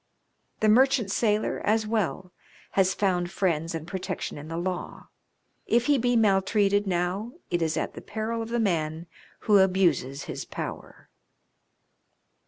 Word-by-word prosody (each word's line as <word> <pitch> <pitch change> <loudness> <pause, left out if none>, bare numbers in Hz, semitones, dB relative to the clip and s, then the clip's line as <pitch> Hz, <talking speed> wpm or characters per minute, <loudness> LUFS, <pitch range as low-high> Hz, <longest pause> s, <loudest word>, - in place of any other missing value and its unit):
The 215 - +3
merchant 245 -1 +4
sailor, 210 -1 0
as 220 +1 +2
well, 190 -4 -2 0.4
has 190 -1 +2
found 180 -3 0
friends 165 -4 -1
and 160 -1 -5
protec 185 0 -4
tion - - -5
in 150 - -9
the 165 +1 -5
law. 180 +1 -4 0.6
If 235 +1 +3
he 285 -1 +3
be 245 +1 +1
maltreated 205 -1 +3
now 185 +6 -1 0.2
it 175 -1 +1
is 160 -1 0
at - - -2
the - - -9
peril 225 +2 -3
of 225 - -5
the 240 0 0
man 165 -5 -1 0.4
who 210 -3 +5
abuses 175 -8 +2
his - - -5
power. - - -7
195 Hz, 150 wpm, -26 LUFS, 175-220 Hz, 0.6 s, who